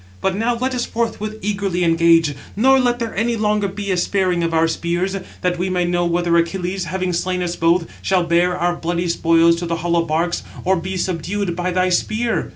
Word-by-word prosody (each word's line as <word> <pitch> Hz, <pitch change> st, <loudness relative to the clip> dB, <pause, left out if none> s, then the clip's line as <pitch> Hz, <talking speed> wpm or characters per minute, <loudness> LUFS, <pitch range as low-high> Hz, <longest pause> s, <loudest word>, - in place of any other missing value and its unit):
But 190 Hz, -1 st, 0 dB
now 235 Hz, +3 st, 0 dB
let 260 Hz, +2 st, -1 dB
us 245 Hz, -1 st, -1 dB
forthwith 220 Hz, -2 st, -3 dB
eagerly 195 Hz, -3 st, -1 dB
engage, 165 Hz, -2 st, +4 dB, 0.2 s
nor 265 Hz, +5 st, +4 dB
let 245 Hz, -1 st, +2 dB
there 230 Hz, -2 st, -4 dB
any 230 Hz, +1 st, 0 dB
longer 210 Hz, -1 st, +1 dB
be 200 Hz, +1 st, -4 dB
a 185 Hz, -, +1 dB
sparing 180 Hz, -1 st, +1 dB
of 165 Hz, 0 st, 0 dB
our 165 Hz, 0 st, +3 dB
spears, 175 Hz, +3 st, -1 dB, 0.3 s
that 180 Hz, -1 st, 0 dB
we 185 Hz, +1 st, -1 dB
may 180 Hz, -1 st, 0 dB
know 175 Hz, 0 st, 0 dB
whether 170 Hz, 0 st, +1 dB
Achilles, 180 Hz, +2 st, -1 dB
having 185 Hz, +2 st, -2 dB
slain 180 Hz, +1 st, -1 dB
us 175 Hz, 0 st, -2 dB
both, 165 Hz, +1 st, +2 dB, 0.2 s
shall 185 Hz, -2 st, +1 dB
bear 175 Hz, +1 st, +2 dB
our 175 Hz, 0 st, 0 dB
bloody 175 Hz, +1 st, -2 dB
spoils 165 Hz, 0 st, +3 dB
to 175 Hz, 0 st, -4 dB
the 170 Hz, -, -1 dB
hollow 170 Hz, 0 st, +2 dB
barks, 165 Hz, +2 st, -1 dB, 0.2 s
or 190 Hz, +1 st, +3 dB
be 185 Hz, +2 st, -4 dB
subdued 180 Hz, +1 st, -2 dB
by 180 Hz, +1 st, -2 dB
thy 185 Hz, 0 st, +1 dB
spear." 220 Hz, +5 st, 0 dB
180 Hz, 205 wpm, -19 LUFS, 170-200 Hz, 0.3 s, engage